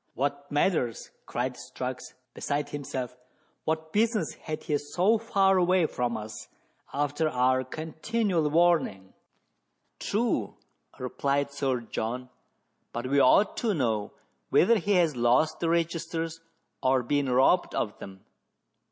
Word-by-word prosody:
"What 140 +2 -2
matters?" 145 -6 0 0.2
cried 125 +1 -2
Strux, 125 +1 -6 0.2
beside 145 0 -2
himself; 130 -4 -5 0.5
"what 160 0 -2
business 215 -5 +1
had 155 -1 -6
he 150 -2 0
so 180 +10 +2
far 195 -4 +3
away 180 -1 +3
from 120 -5 -2
us, 110 0 -8 0.4
after 145 +2 0
our 130 0 +2
continual 160 - -1
warning.?" 155 - +2 0.4
" - - -49
True," 205 - -1 0.4
replied 140 +2 -1
Sir 135 -3 -1
John, 120 +2 -4 0.3
" - - -47
but 120 +1 -4
we 140 +2 +2
ought 165 +11 +5
to 220 -4 0
know 110 -7 -1 0.4
whether 230 +4 +5
he 200 +3 0
has 170 -6 +3
lost 125 +6 +2
the 165 - 0
registers 165 -1 -1 0.4
or 130 -1 +2
been 140 +2 0
robbed 135 +8 +3
of 105 - -2
them.. 95 -1 -11
145 Hz, 130 wpm, -28 LUFS, 125-170 Hz, 0.5 s, ought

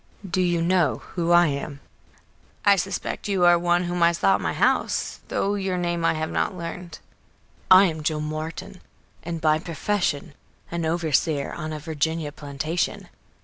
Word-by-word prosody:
"Do 185 +1 0
you 175 -2 +1
know 180 -1 +1
who 170 -1 0
I 175 0 +7
am?" 140 -1 -3 0.9
"I 200 - +7
suspect 195 +3 -3
you 190 -3 +2
are 175 0 +6
one 175 +1 +2
whom 175 0 -2
I 170 0 +5
saw 195 +3 +3
at - - 0
my - - -1
house, - - 0
though 200 - 0
your 190 -2 -1
name 175 -1 -1
I - - +3
have 155 0 -3
not 190 - -1
learned." 170 -1 -7 0.7
"I 185 +1 +9
am 160 -4 -2
Joel 150 0 -1
Martin, 155 +5 -6 0.4
and 165 0 -5
by 155 -1 +2
profession 165 -3 -2 0.4
an 170 -1 -2
overseer 160 -3 0
on 155 -2 -5
a 155 - -4
Virginia 160 0 -2
plantation. 150 +4 -3
170 Hz, 165 wpm, -24 LUFS, 155-180 Hz, 0.9 s, I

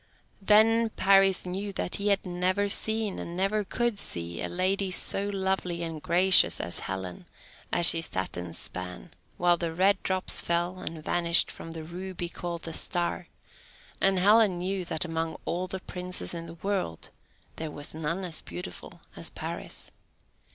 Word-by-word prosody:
Then 220 +3 +4
Paris 195 -2 +3
knew 195 +3 -4
that 180 - -2
he 200 - -2
had 200 -1 +2
never 185 +3 0
seen, 220 0 0
and 170 +1 -6
never 200 +3 0
could 235 +1 -1
see, 85 - -3
a - - -3
lady 190 +2 0
so 195 +2 +1
lovely 190 -3 -2
and 165 -2 -5
gracious 180 +3 +5
as 85 - -2
Helen 95 -2 -6 0.4
as 175 - +6
she 165 -1 +8
sat 95 -12 -3
and 90 -1 -5
span, 90 -10 -5 0.3
while 175 0 +3
the 170 -1 -3
red 195 +2 +3
drops 185 0 +3
fell 175 +2 -1
and 165 -4 -4
vanished 170 0 +3
from 165 - -9
the 160 -1 -7
ruby 175 +1 -6
called 170 -1 -6
the 165 - -6
Star; 175 +2 -2 0.7
and 195 0 +4
Helen 205 0 +4
knew 185 +1 -3
that 160 0 -2
among 165 -1 -3
all 180 +2 -2
the 190 +1 -5
princes 180 -1 -2
in 170 -1 -6
the 165 - -10
world 185 - -3 0.5
there 160 -1 -4
was 145 0 -5
none 165 +4 -3
so 155 - -4
beautiful 90 +1 -9
as - - 0
Paris. - - -7
180 Hz, 165 wpm, -27 LUFS, 165-195 Hz, 0.7 s, she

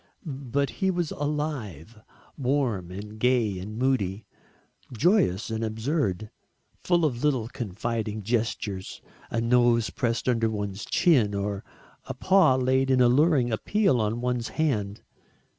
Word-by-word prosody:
But 140 -2 -2
he 190 - +3
was 175 -4 -1
alive, 135 - -4 0.3
warm 125 - -1
and 105 +3 -8
gay 115 -6 +2
and 105 +4 -7
moody 115 -6 0 0.7
joyous 120 - +2
and 110 0 -2
absurd 110 - -2 0.5
full 175 -2 +2
of 125 -4 -2
little 130 -7 +1
confiding 110 -1 -4
gestures 110 -4 -2 0.3
a 115 - -1
nose 120 -1 +3
pressed 115 0 -2
under 115 -2 +2
one's 105 -1 -4
chin, 120 - +3
or 100 0 -3 0.4
a - - -6
paw 185 -8 +4
laid 130 +1 +1
in 130 -1 +3
alluring 125 +1 +4
appeal 180 - +1
on 110 +3 -1
one's 125 -2 -1
hand. 110 -10 -2
120 Hz, 125 wpm, -26 LUFS, 105-135 Hz, 0.7 s, paw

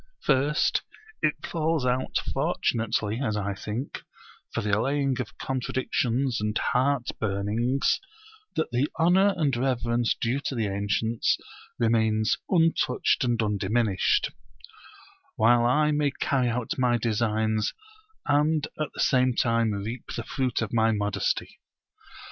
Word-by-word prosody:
First 145 +3 +2 0.4
it - - 0
falls 160 -4 0
out 125 +1 0 0.2
fortunately 110 0 0
as 110 -5 -1
I 100 -1 -2
think 105 +6 -5 0.5
for - - -2
the 105 - -2
allaying 135 +3 0
of 110 -3 -9
contradictions 130 -1 -1
and 105 0 -1
heart 130 0 +1
burnings, 110 +6 0 0.6
that 160 - -1
the 125 +4 +1
honour 190 +4 +4
and 145 -6 +1
reverence 120 -2 0
due 120 +4 0
to 135 - -2
the 115 -3 0
ancients 100 +3 0 0.4
remains 110 -2 +2
untouched 165 -9 +2
and 120 -2 +1
undiminished; 105 0 +1 1.0
while 120 +2 +4
I 150 +4 +3
may 145 -1 +2
carry 130 -2 0
out 120 +2 -2
my 125 -2 +3
designs 110 -1 0 0.5
and 150 +1 +2
at 155 - -1
the - - -2
same 130 -2 +3
time 115 -1 +2
reap 105 +4 -5
the 115 - -3
fruit 130 +1 -1
of - - -5
my 115 -1 +3
modesty. 105 -2 -1
120 Hz, 125 wpm, -26 LUFS, 110-135 Hz, 1.0 s, honour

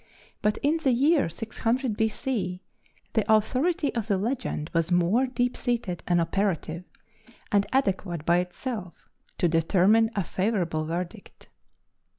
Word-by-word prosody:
But 210 0 +1
in 300 +3 +3
the 275 -6 +2
year 280 - +3
600 225 - -2
B.C. 220 -4 -1 0.5
the 220 -1 +1
authority 265 +9 +2
of 230 -3 -2
the 200 -3 +2
legend 220 - -3
was 165 +1 +1
more 180 +9 +3
deep 250 -1 -1
seated 235 -8 -2
and 175 -1 +3
operative, 170 -1 -1 0.7
and 200 -1 +3
adequate 190 - 0
by 170 +1 +4
itself 180 +1 -5 0.3
to 175 - +2
determine 185 +7 +3
a 200 - +1
favorable 175 -5 -1
verdict. 170 +2 -6
205 Hz, 130 wpm, -26 LUFS, 175-245 Hz, 0.7 s, by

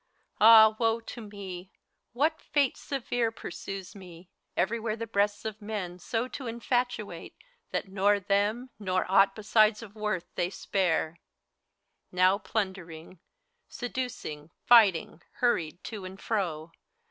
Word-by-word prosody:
Ah, 220 0 +8
woe 225 -1 +2
to 230 +1 -9
me 195 -3 -8
I - - -40 0.4
What 310 +6 +1
fate 285 -3 +1
severe 245 -4 -2
Pursues 195 -2 -7
me, 180 -2 -13 0.3
everywhere 220 +4 0
the 230 0 -5
breasts 205 -1 0
of 215 0 -5
men 200 -4 -5
So 230 +6 -2
to 260 0 -7
infatuate, 235 -5 -2 0.3
that - - -3
nor 200 +2 +2
them, 205 +6 0
nor 185 -2 0
aught 195 +1 +4
Besides 215 0 +3
of 205 -3 -11
worth, 210 -5 -2
they 175 - -1
spare? 170 -4 -1 0.9
Now 185 +2 +3
plundering. 185 -5 -4 0.5
Seducing, 245 - -5 0.2
fighting, 200 -8 +5
hurried 175 -9 0
to 215 -4 -7
and 190 +1 -9
fro. 170 -7 -2
205 Hz, 125 wpm, -28 LUFS, 185-230 Hz, 0.9 s, Ah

